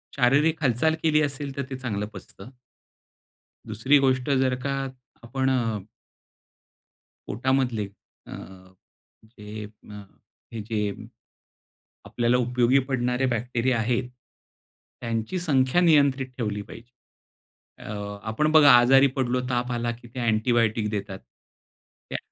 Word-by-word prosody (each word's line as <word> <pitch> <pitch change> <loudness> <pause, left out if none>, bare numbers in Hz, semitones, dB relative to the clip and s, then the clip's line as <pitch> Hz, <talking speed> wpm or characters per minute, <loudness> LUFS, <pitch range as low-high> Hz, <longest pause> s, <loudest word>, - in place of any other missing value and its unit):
शारीरिक 145 +5 +3
हालचाल 140 +5 +2
केली 155 -1 +3
असेल, 140 -1 -3
तर 140 - -1
ते 135 - -4
चांगलं 110 -5 -3
पचतं. 95 +2 -12 1.2
दुसरी 115 +7 +3
गोष्ट 130 -1 +1
जर 130 -2 +2
का 140 - 0 0.5
आपण 130 +3 -1
अ 115 -6 -1 1.4
पोटामधले 125 -2 0 0.4
अ, - - -9 0.9
जे 105 -1 -9
अ, 105 0 -12 0.5
हे 115 - -4
जे, 110 +1 -3 1.3
आपल्याला 120 +1 +1
उपयोगी 125 +1 +2
पडणारे 125 0 0
बॅक्टेरिया 120 +1 0
आहेत, 120 +2 0 0.9
त्यांची 115 +8 -3
संख्या 140 -2 +2
नियंत्रित 140 -6 +4
ठेवली 105 -4 -3
पाहिजे. 115 +3 -13 0.9
अ, 100 -1 -6
आपण 150 +8 +1
बघा 155 -2 +8
आजारी 135 +3 +6
पडलो, 125 -1 0
ताप 125 0 -1
आला, 120 0 -1
की 120 0 -13
ते 130 - -4
अँटिबायोटिक 115 -1 +1
देतात. 100 -2 -4 0.9
त्या - - -2
125 Hz, 115 wpm, -25 LUFS, 110-135 Hz, 1.4 s, बघा